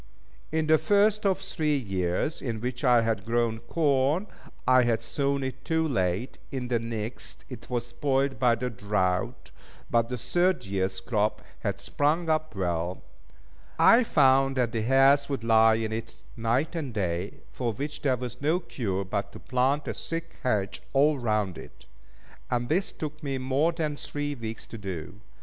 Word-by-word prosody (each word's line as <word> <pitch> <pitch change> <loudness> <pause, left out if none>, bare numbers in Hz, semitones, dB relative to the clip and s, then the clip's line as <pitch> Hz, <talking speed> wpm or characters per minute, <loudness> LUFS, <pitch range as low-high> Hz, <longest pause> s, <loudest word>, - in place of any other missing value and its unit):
In 160 0 +1
the 155 0 +5
first 210 0 +3
of 190 -2 +2
the 195 - -11
three 155 -6 0
years 95 - -1
in 115 -4 -3
which 125 +2 -4
I 120 -3 +5
had 110 -3 0
grown 115 0 0
corn, 145 - +1 0.4
I 130 0 +6
had 120 -2 +2
sown 140 +2 -1
it 130 0 -5
too 160 -1 +1
late; 95 - -1
in 125 -2 -4
the 120 -2 +2
next, 110 -3 -5
it 120 -3 -9
was 120 -2 -1
spoilt 135 +3 0
by 125 -2 +4
the 125 +2 -3
drought; 95 -3 -1 0.4
but 115 0 +2
the 125 - -3
third 175 - +1
years' 95 -1 -2
crop 105 0 0 0.2
had 100 -3 -2
sprung 155 +9 0
up 155 -3 -1
well. 90 -1 -2 0.7
I 235 +2 +7
found 135 - +4
that 120 -3 +1
the 115 - -1
hares 135 +4 +4
would 135 -5 -2
lie 110 -1 +5
in 110 -1 -2
it 110 +1 -6
night 120 +8 0
and 155 -7 -3
day, 90 -3 -2 0.2
for 120 -2 -2
which 145 +7 -5
there 130 -3 +2
was 125 0 -6
no 155 +5 +2
cure 100 - -3
but 100 +1 -3
to - - -9
plant 135 +3 0
a - - -1
thick 165 0 -5
hedge 105 -6 -1
all 145 +1 +4
round 105 -6 0
it; - - -13 0.6
and 120 -1 -1
this 185 +6 +1
took 155 0 -6
me 140 -3 -2
more 135 +5 +1
than 155 -3 -2
three 145 0 -4
weeks 115 -4 -6
to 115 - -9
do. 95 0 -6
125 Hz, 175 wpm, -27 LUFS, 110-145 Hz, 0.7 s, I